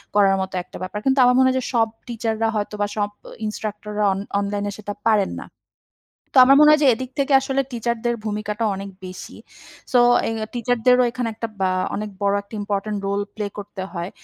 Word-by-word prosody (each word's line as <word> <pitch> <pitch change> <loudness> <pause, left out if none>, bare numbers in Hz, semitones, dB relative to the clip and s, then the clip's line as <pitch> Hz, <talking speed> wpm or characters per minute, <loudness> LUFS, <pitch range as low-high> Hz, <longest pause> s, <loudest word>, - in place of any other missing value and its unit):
করার 195 -2 +5
মতো 190 0 -4
একটা - - -11
ব্যাপার। 185 +3 -4
কিন্তু 270 0 +3
আমার 250 0 +5
মনে 260 0 +5
হয় 260 - 0
যে - - -5
সব 230 -2 +3 0.2
টিচাররা 225 -1 -1
হয়তো 210 0 -2
বা 205 - +2
সব 205 -1 0 0.2
অ - - -12
ইন্সট্রাক্টররা 210 0 -4
অন 190 - -4 0.2
অনলাইনেে 205 0 -2
সেটা 205 -1 -6 0.2
পারেন 210 -3 +2
না। - - -10 0.9
তো - - +5
আমার 275 +1 +7
মনে 300 0 +8
হয় 305 0 +5
যে - - +6
এদিক 255 +2 -6
থেকে 280 0 +1
আসলে 270 0 -1
টিচারদের 235 0 -1
ভূমিকাটা 210 +1 -2
অনেক 195 +1 -6
বেশি। 185 0 -9 0.6
সো 250 - +5 0.3
এ - - -1 0.2
টিচারদেরও 245 +1 +3
এখানে 245 0 -3
একটা 230 +1 -4
বা 190 -1 +2 0.2
অনেক 210 +1 -3
বড় 200 0 +2
একটা 200 +2 -13
ইম্পোর্টেন্ট 205 0 -2
রোল 200 +1 0
প্লে 210 -1 -3
করতে 200 -1 -7
হয়। 175 0 -4
215 Hz, 200 wpm, -22 LUFS, 200-245 Hz, 0.9 s, মনে